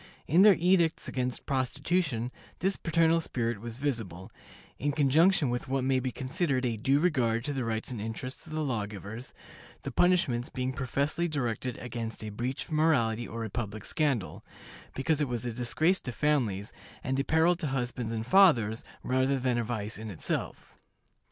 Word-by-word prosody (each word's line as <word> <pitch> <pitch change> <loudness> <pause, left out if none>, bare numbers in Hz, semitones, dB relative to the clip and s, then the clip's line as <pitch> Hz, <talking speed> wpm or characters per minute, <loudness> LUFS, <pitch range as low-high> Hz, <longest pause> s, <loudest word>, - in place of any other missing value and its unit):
In 165 +6 +5
their 205 -1 +8
edicts 170 -2 +2
against 125 -2 -2
prostitution 130 -1 0 0.3
this 190 +2 0
paternal 165 0 +2
spirit 115 -7 -2
was 115 0 -6
visible, 110 -10 -3 0.5
in 145 +2 0
conjunction 150 +1 +4
with 120 - -3
what 135 0 0
may 130 0 +2
be 130 0 -2
considered 135 - -1
a 120 -2 0
due 135 +6 +2
regard 125 -9 +1
to 145 - -2
the 135 -2 -2
rights 115 +1 -2
and 115 -4 -4
interests 115 +4 -6
of - - -8
the 155 0 -1
law 115 -8 -1
givers, 105 +4 -8 0.5
the - - -4
punishments 140 -9 +2
being 130 0 -2
professedly 140 +6 -1
directed 125 -5 -2
against 115 -2 -5
a 110 - -4
breach 120 +5 -3
of - - -17
morality 120 -8 +2
or 115 0 -5
a - - -5
public 110 -2 -4
scandal, 140 - -1 0.5
because 150 +3 0
it 145 - +1
was 120 -2 -3
a 120 - -2
disgrace 155 +10 +1
to 125 - -5
families, 120 -9 0 0.3
and 130 +1 -1
a - - +2
peril 160 +4 +3
to 165 -3 -3
husbands 125 -3 -2
and 110 -1 -3
fathers, 125 - +4 0.2
rather 130 +2 +1
than 125 -2 0
a - - 0
vice 110 -2 -4
in 110 0 -6
itself. 95 - -4
130 Hz, 175 wpm, -29 LUFS, 115-150 Hz, 0.5 s, their